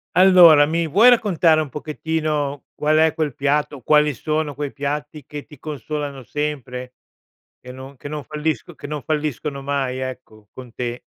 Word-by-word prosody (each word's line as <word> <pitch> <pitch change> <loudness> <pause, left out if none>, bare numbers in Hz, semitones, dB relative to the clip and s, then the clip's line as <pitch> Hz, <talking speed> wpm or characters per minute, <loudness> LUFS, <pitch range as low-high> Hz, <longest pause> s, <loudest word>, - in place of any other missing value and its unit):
Allora, 180 -5 +8
mi 165 +2 -1
vuoi 210 - +5
raccontare 175 -9 +3
un 150 - -5
pochettino 150 -1 -3
qual 155 +1 +1
è 160 0 +4
quel 155 -4 -2
piatto, 145 +1 -1
quali 150 +3 +3
sono 155 +4 -2
quei 145 0 -4
piatti 150 +1 -4
che 145 0 -8
ti 150 - -15
consolano 145 -1 -5
sempre? 130 -3 -5 0.6
Che 125 - -11
non 130 +2 -11
che 145 - -9
non 150 0 -5
fallisco 155 +3 -3
che - - -9
non 150 -1 -5
falliscono 150 -2 -3
mai 135 -2 -2
ecco, 125 -5 -8
con 125 -3 -12
te? 120 0 -5
150 Hz, 160 wpm, -21 LUFS, 135-155 Hz, 0.6 s, Allora